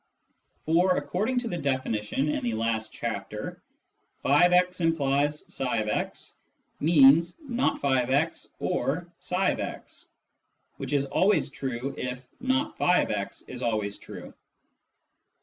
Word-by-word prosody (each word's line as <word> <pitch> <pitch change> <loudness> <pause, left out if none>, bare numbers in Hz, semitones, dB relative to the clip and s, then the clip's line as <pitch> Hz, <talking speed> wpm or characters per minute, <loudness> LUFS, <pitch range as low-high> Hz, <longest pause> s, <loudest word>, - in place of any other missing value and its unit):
For, 175 +3 +3
according 220 +8 -1
to 240 - -4
the 175 -5 -3
definition 130 -2 -1
in 150 - -1
the 120 -2 -1
last 110 0 -1
chapter, 105 -2 -5 0.3
" - - -33
<f>x 180 +4 +4
implies 145 -2 +1
ifix 115 -5 -2 0.2
" - - -45
means 155 +1 +6
" 320 -4 -18
aot 140 - +1
<f>x 145 +5 0
or 175 0 -2
tfix," 185 +1 -2 0.7
which - - -5
is 140 -1 +2
always 180 +1 +2
true 135 0 -4
if 125 0 -5
not 265 +4 -1
<f>x 105 - +1
is 125 -1 -7
always 105 -4 -1
true. - - -10
140 Hz, 115 wpm, -27 LUFS, 125-180 Hz, 0.7 s, means